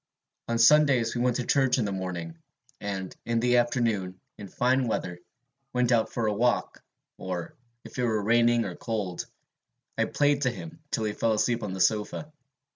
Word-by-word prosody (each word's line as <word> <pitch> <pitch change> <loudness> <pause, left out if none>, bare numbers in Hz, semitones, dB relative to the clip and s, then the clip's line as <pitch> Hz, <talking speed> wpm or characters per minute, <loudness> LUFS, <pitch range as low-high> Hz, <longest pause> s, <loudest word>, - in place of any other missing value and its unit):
"On 115 - 0
Sundays 125 -1 +5
we 120 - -2
went 125 -1 +2
to 125 - -2
church 135 -1 +3
in 120 - +1
the 100 - -2
morning, 85 -3 -5 0.4
and 95 -2 -5
in 115 0 0
the 125 +1 +3
afternoon, 115 -6 0 0.2
in 100 - -7
fine 125 +5 +1
weather, 90 -5 -3 0.5
went 125 -1 +1
out 115 -2 +2
for 115 - -1
a 105 - +1
walk; 120 +4 0 0.4
or, 90 -2 -5 0.3
if - - -9
it - - +1
were 110 -3 +1
raining 120 +1 +3
or 95 - -4
cold, 105 -6 -4 0.7
I - - +3
played 145 -1 +1
to 130 - +2
him 160 +6 -8
till 110 - -1
he 105 -1 -1
fell 115 +1 +1
asleep 115 +2 +1
on 105 -3 -4
the 95 - -5
sofa. 110 +10 0
115 Hz, 185 wpm, -27 LUFS, 100-125 Hz, 0.7 s, Sundays